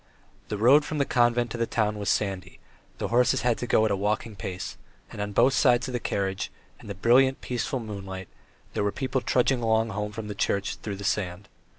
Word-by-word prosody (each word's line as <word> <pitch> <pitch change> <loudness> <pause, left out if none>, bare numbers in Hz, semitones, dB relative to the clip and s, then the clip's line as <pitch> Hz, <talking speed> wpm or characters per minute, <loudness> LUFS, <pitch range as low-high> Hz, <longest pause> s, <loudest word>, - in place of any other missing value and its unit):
The 105 - -3
road 130 +8 +6
from 155 - -4
the 140 - +2
convent 120 -1 +2
to 120 - -5
the 115 - +1
town 105 -2 0
was 100 - -2
sandy, 95 -3 -1 0.4
the - - -3
horses 120 +1 +3
had 120 -2 +1
to 125 - -3
go 110 -2 +4
at 110 - +1
a - - +2
walking 105 +2 -1
pace, 95 -1 -5 0.4
and - - -6
on 105 0 -3
both 120 +6 +4
sides 125 -1 +3
of - - -4
the 120 - -2
carriage 95 -3 -2 0.3
in - - -13
the - - -5
brilliant, 130 +7 +4
peaceful 125 +1 -2
moonlight 95 -4 -7 0.5
there - - 0
were 100 - +1
people 130 +1 -2
trudging 125 0 +2
along 110 0 +2
home 105 +1 -3
from 105 -1 -6
church 100 -1 -1
through 105 -2 -5
the 100 - -8
sand. 100 -1 -2
110 Hz, 215 wpm, -26 LUFS, 100-120 Hz, 0.5 s, road